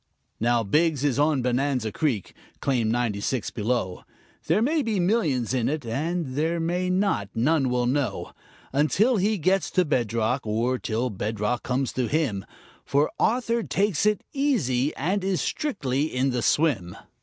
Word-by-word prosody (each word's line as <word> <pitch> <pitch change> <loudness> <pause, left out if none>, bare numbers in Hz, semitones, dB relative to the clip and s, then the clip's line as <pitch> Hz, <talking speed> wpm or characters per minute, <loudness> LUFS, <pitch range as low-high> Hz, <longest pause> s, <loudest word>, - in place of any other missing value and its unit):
Now, 120 0 +2
Biggs 150 +6 +1
is 145 -2 +1
on 145 -3 +2
Bonanza 125 -2 0
Creek, 125 - -1 0.3
claim 125 -5 +1
ninety 115 -3 0
six, 125 0 -2
below; 105 -5 -2 0.5
There - - +3
may 305 +5 +2
be 225 -6 -1
millions 160 - +1
in 125 -3 +1
it, 150 -3 -3
and 150 +4 -2
there 160 +4 0
may 175 +2 -1
not; 185 - +1
none 135 +3 +2
will 125 0 +1
know 130 +2 -1 0.4
Until 190 - +3
he 205 +3 +1
gets 190 +3 +1
to 185 - +2
bedrock 120 -2 0
or 120 +4 0
till 115 +2 -2
bedrock 105 +3 -2
comes 130 +1 -1
to 125 -2 -1
him 135 -11 -1 0.4
For 145 +2 +1
Arthur 235 0 +1
takes 205 -3 +1
it 210 -1 +1
easy 160 - +1
and 185 +7 -1
is 190 -2 0
strictly 145 - -1
in 135 -3 0
the 125 -1 -1
swim. 115 - +1
140 Hz, 155 wpm, -25 LUFS, 120-180 Hz, 0.5 s, There